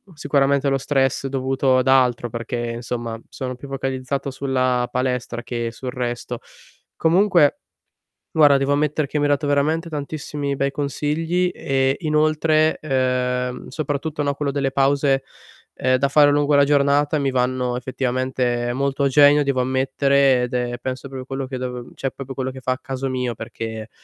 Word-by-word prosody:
sicuramente 140 -1 +1
lo 135 0 +2
stress 135 0 0
dovuto 135 0 +1
ad 130 +1 +1
altro 125 -3 +3
perché, 120 +1 -4
insomma, 115 -1 -4
sono 130 -1 -5
più 140 +3 -11
focalizzato 135 0 -3
sulla 130 -2 0
palestra 125 -1 -2
che 120 -1 -3
sul 125 +2 -6
resto. 120 -1 -4 0.6
Comunque, 170 -2 +3 0.7
guarda 145 -3 +6
devo 135 +1 0
ammettere 150 0 0
che 150 - -3
mi 145 - +1
hai 145 - +2
dato 145 +1 +1
veramente 155 +4 +1
tantissimi 145 -1 -4
bei 140 0 0
consigli 160 +5 -1
e 135 0 0
inoltre, 155 0 +2
ehm, 125 -2 -1
soprattutto 150 0 -3
no, 140 0 0
quello 140 -1 -2
delle 135 -1 -1
pause, 135 0 +2 0.5
ehm, 130 0 +2
da 140 - +1
fare 145 0 +6
lungo 145 0 +2
la 140 0 +6
giornata 145 +1 +2
mi 135 -1 0
vanno 125 -1 0
effettivamente 125 -1 -1
molto 140 +1 -1
a - - +4
genio 145 +1 +6
devo 135 -2 0
ammettere 130 0 +2
ed 125 +1 -4
è 120 -1 -1
penso 130 +2 -5
proprio 130 -1 -7
quello 135 0 -4
che 130 -1 -5
dovev 125 -1 -6
cioè, 135 - -3
proprio 135 -1 -8
quello 130 -1 -2
che 130 - -9
fa 130 - -1
al 130 - -10
caso 135 0 -4
mio 125 -2 -2
perché, 110 -1 -6
135 Hz, 165 wpm, -21 LUFS, 125-145 Hz, 0.7 s, guarda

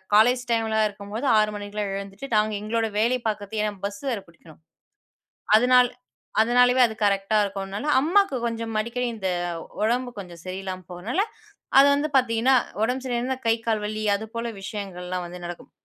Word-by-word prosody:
College 245 +4 +5
டைம்ல 220 -1 +2
இருக்கும்போது 205 +5 -5
6:00 215 0 +3
மணிக்கெல்லாம் 205 0 -4
எழுந்துட்டு, 200 +7 -8
நாங்க 215 0 +2
எங்களோட 225 +1 -1
வேலைய 240 +3 +2
பாக்குறதுக்கு. 210 0 -2
ஏன்னா, 210 -1 -1
பஸ் 205 0 -9
வேற 220 -5 -2
புடிக்கணும். 160 -1 -18 1.0
அதனால 250 +2 +6 0.5
அதனாலவே 245 +2 +4
அது 225 -2 0
கரெக்டா 200 +1 +2
இருக்கும்னால 200 +6 -4
அம்மாக்கு 345 +2 +3
கொஞ்சம் 230 -1 -3
அடிக்கடி 235 +3 -2
இந்த 195 -4 -3 0.5
உடம்பு 245 +4 +1
கொஞ்சம் 175 -4 -9
சரியில்லாம 185 0 -5
போகறதனால, 200 - -2 0.6
அது 275 - +8
வந்து 295 +2 -1
பாத்தீங்னா, 250 +1 +3 0.3
உடம்பு 250 +3 0
சரியிலனா, 250 +1 -1
கை, 225 - +5
கால் 220 -2 +1
வலி 215 +1 -3
அது 210 +2 -4
போல 230 0 -2
விஷயங்கள்லாம் 185 -3 -5
வந்து 180 +1 -9
நடக்கும். 175 0 -8
220 Hz, 150 wpm, -25 LUFS, 200-245 Hz, 1.0 s, அது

